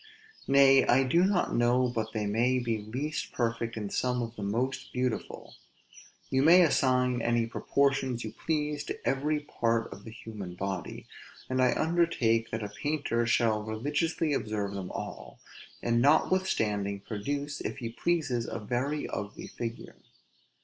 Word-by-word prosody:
Nay, 135 -1 +6
I 130 +2 +5
do 165 +7 +3
not 190 -1 +1
know 120 +2 +3
but 110 -2 -3
they 110 -2 -2
may 120 +5 +2
be 115 -3 -1
least 130 +9 -4
perfect 115 -1 -1
in 105 -2 -4
some 125 -1 0
of 115 0 -6
the 105 - -7
most 120 +7 -2
beautiful. 125 -1 -3 0.8
You 130 0 +3
may 175 +5 +7
assign 125 -5 +2
any 120 0 +2
proportions 135 0 0
you 110 - -5
please 150 +3 -2
to - - -5
every 150 +3 +1
part 115 -5 -1
of 100 - -13
the - - -9
human 105 -5 -8
body; 95 -1 -4 0.5
and 130 0 +2
I 125 -1 +4
undertake 155 -10 +2
that 110 -1 -3
a 105 - -4
painter 145 -6 0
shall 115 -3 +2
religiously 145 +8 -1
observe 105 -5 -2
them 95 -2 -5
all, - - -7 0.4
and 120 0 +2
notwithstanding 110 - +2
produce, 140 +8 -4
if - - -4
he 120 -4 -4
pleases, 135 -3 -1
a - - -4
very 130 +7 -2
ugly 100 +1 -5
figure. 115 -1 -6
120 Hz, 150 wpm, -29 LUFS, 110-140 Hz, 0.8 s, may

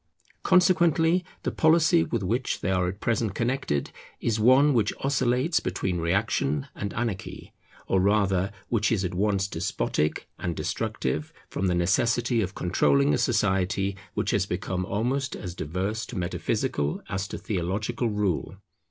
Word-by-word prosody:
Consequently 175 -1 +4 0.2
the - - -1
policy 165 +1 +4
with 115 -4 -2
which 120 +7 -1
they 95 - 0
are 90 -1 +1
at 95 +3 -5
present 115 -3 0
connected 120 - -1 0.3
is 115 -2 0
one 130 +6 +5
which 110 -4 +2
oscillates 135 +3 +1
between 90 -2 -2
reaction 85 -5 0
and 100 - -4
anarchy, 110 -5 -4 0.3
or 95 - +2
rather 95 -1 +2 0.2
which 105 -3 +1
is 100 -5 +1
at 90 - -3
once 100 +1 +1
despotic 75 -3 -1
and 85 - -2
destructive, 75 +4 -2 0.2
from 95 - -1
the 90 - +1
necessity 115 +6 +2
of 95 -1 -3
controlling 140 +10 +2
a - - +2
society 100 -4 +1 0.2
which - - 0
has 100 -1 +1
become 90 0 -2
almost 130 +6 -1
as 90 -4 -6
diverse 95 +8 -3
to 120 - -7
metaphysical 75 -4 -1
as 95 -1 -3
to - - -6
theological 105 +5 -2
rule. 105 -5 -1
100 Hz, 145 wpm, -26 LUFS, 90-120 Hz, 0.3 s, one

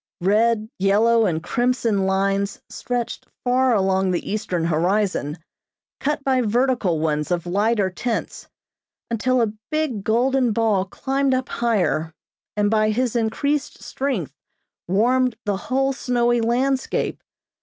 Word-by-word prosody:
Red, 215 +3 +2
yellow 220 +3 +3
and 160 -2 -2
crimson 230 -2 0
lines 195 +1 0
stretched 245 -1 -4 0.2
far 255 0 +3
along 190 -1 +1
the 180 +1 -2
eastern 180 -5 -1
horizon, 170 -1 0 0.6
cut 295 0 -1
by 260 -2 +2
vertical 235 -6 +1
ones 150 -1 -1
of 175 -1 -1
lighter 200 +2 +1
tints, 230 +6 -4 0.6
until 250 +2 +2
a 215 -2 -1 0.2
big 305 -10 -1
golden 245 +2 +2
ball 210 -4 +1
climbed 270 +6 0
up 255 0 -2
higher, 190 -9 0 0.4
and 205 0 +2
by 215 -1 +3
his 245 +2 0
increased 280 +6 -1
strength 260 - -3 0.5
warmed 245 +6 +2
the 205 -2 0
whole 270 +1 +1
snowy 240 -2 +1
landscape. 255 +3 0
225 Hz, 125 wpm, -22 LUFS, 195-255 Hz, 0.6 s, yellow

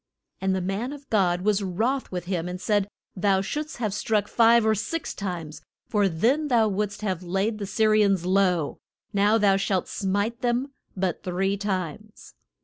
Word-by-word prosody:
] - - -46
And 190 0 +1
the 190 - -1
man 200 +9 -2
of 285 -1 -11
God 180 -5 +2
was 210 +1 +2
wroth 225 +9 -1
with 180 -2 -4
him, 180 -2 -2
and 180 0 -5
said, 205 0 +1 0.3
Thou 195 0 +2
shouldst 300 +9 -4
have 215 -5 -2
struck 210 0 0
five 230 -1 +5
or 220 - +4
six 295 +10 -3
times, 175 -6 -5 0.3
for 205 -2 +2
then 245 - +1
thou 235 -5 +3
wouldst 205 +1 -2
have 185 -4 -1
laid 195 +5 -1
the 200 - -4
Sy 220 +3 0
ri 215 0 +5
ans 195 -4 +1
low, 180 -5 +1 0.3
now 205 +2 +4
thou 200 -3 +4
shalt 195 -2 0
smite 205 +4 -1
them 245 +2 0 0.3
but 185 -3 -1
three 190 +1 0
times. 200 0 -5
200 Hz, 185 wpm, -25 LUFS, 185-220 Hz, 0.3 s, five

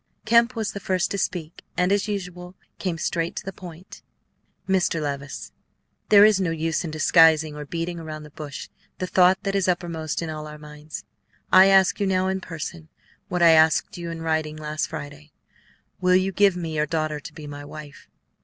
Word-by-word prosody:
Kemp 235 +2 +4
was 220 -2 -2
the 200 - -6
first 185 -1 -1
to 200 - -2
speak, 170 -3 -3 0.2
and, 180 +1 +2
as 200 +1 +1
usual, 180 -3 -5 0.2
came 180 -4 -2
straight 165 +1 -2
to - - -6
the 195 - -5
point. 180 0 -11 0.7
"Mr. 185 -3 +1
Levice, 140 -2 -5 0.6
there 205 0 +8
is 210 -3 +4
no 180 - 0
use 165 0 -1
in 165 - -4
disguising 155 -1 +4
or 150 -1 -7
beating 170 +2 -4
around 155 -1 -7
the 150 - -13
bush 145 -2 -8 0.3
the 185 - -2
thought 185 +1 +4
that 195 - -1
is 195 -2 +1
uppermost 170 -3 -2
in 165 - -4
all 155 0 -6
our 150 0 -9
minds. 150 +1 -10 0.5
I 185 +1 +9
ask 195 0 +4
you 200 - +1
now, 185 0 +1
in 190 0 -2
person, 165 -1 -7 0.4
what 180 -1 0
I 165 - +8
asked 160 0 +4
you 170 -1 -6
in 165 -1 -6
writing 160 -1 -1
last 155 0 -3
Friday, 145 +1 -9 0.7
will 180 0 +3
you 185 +1 +2
give 200 -1 +3
me 165 -3 -4
your 150 0 +1
daughter 155 -1 -2
to - - -10
be 155 - -9
my 145 0 -8
wife?" 145 0 -11
165 Hz, 195 wpm, -24 LUFS, 155-185 Hz, 0.7 s, I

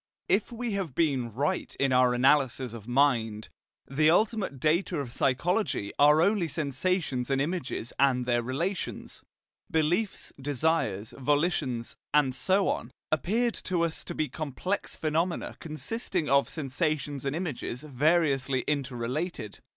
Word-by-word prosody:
If 200 +5 +1
we 240 0 -3
have 190 -9 -3
been 135 -8 +1
right 145 - -2
in 135 -1 +2
our 125 -1 +4
analysis 130 -2 +3
of 115 -2 -9
mind, 120 -5 +1 0.4
the 155 +3 +3
ultimate 200 - +1
data 165 +4 +1
of 130 -5 -4
psychology 135 - 0
are 150 +2 +6
only 200 -2 +2
sensations 145 -2 -1
and 135 -1 +1
images 145 -6 -3
and 130 -3 +3
their 120 -1 +2
relations. 165 +11 -3 0.5
Beliefs, 170 +7 0
desires, 140 -7 0
volitions, 145 -4 0 0.2
and 140 -3 +4
so 190 +9 +2
on, - - -1 0.2
appeared 220 - +1
to 180 -2 +1
us 165 -1 -2
to - - -6
be 155 - 0
complex 155 +8 -3
phenomena 165 +3 -1
consisting 165 +1 -3
of 140 +1 +3
sensations 145 -1 -2
and 140 +1 -1
images 150 -6 -4
variously 140 -2 +2
interrelated. 130 - -3
145 Hz, 130 wpm, -28 LUFS, 130-170 Hz, 0.5 s, are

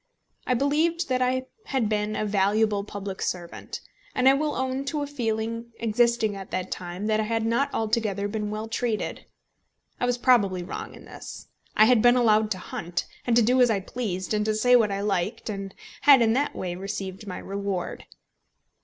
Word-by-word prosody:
I 250 - +2
believed 310 +5 +1
that 255 0 +1
I 255 +1 +1 0.2
had 260 -5 0
been 210 0 -1
a 215 - -1
valuable 205 +1 +2
public 200 -2 -6
servant, 175 -2 -4 0.3
and 255 0 +3
I 265 - +8
will 300 +2 0
own 260 +1 -1
to 290 +1 -2
a - - -2
feeling 230 -3 -3
existing 230 -1 +2
at 195 -1 -8
that 185 0 -3
time 180 +3 -5
that 215 0 +2
I - - +2
had 225 0 -1
not 235 +5 +1
altogether 215 -3 0
been 210 0 -3
well 215 +1 -4
treated. 225 -1 -2 0.7
I 245 - +1
was 245 0 +1
probably 205 -8 +3
wrong 175 - -7
in - - -13
this. - - -10 0.3
I 215 - +8
had 240 -1 +5
been 245 +1 +6
allowed 220 -3 +4
to 200 - -1
hunt, 175 -1 -4 0.2
and 235 - +3
to 240 - +6
do 250 +3 +4
as 245 - +6
I 210 -3 +2
pleased, 190 -2 -4
and 210 0 +1
to 215 0 +1
say 245 +3 +5
what 220 -4 +4
I 195 0 -2
liked, 200 +1 -1
and 195 -1 -5 0.3
had 275 -4 +7
in 225 -1 +3
that 285 +4 0
way 180 -1 -3
received 195 +1 -5
my 185 - -5
reward. 200 -2 -4
220 Hz, 195 wpm, -26 LUFS, 200-245 Hz, 0.7 s, I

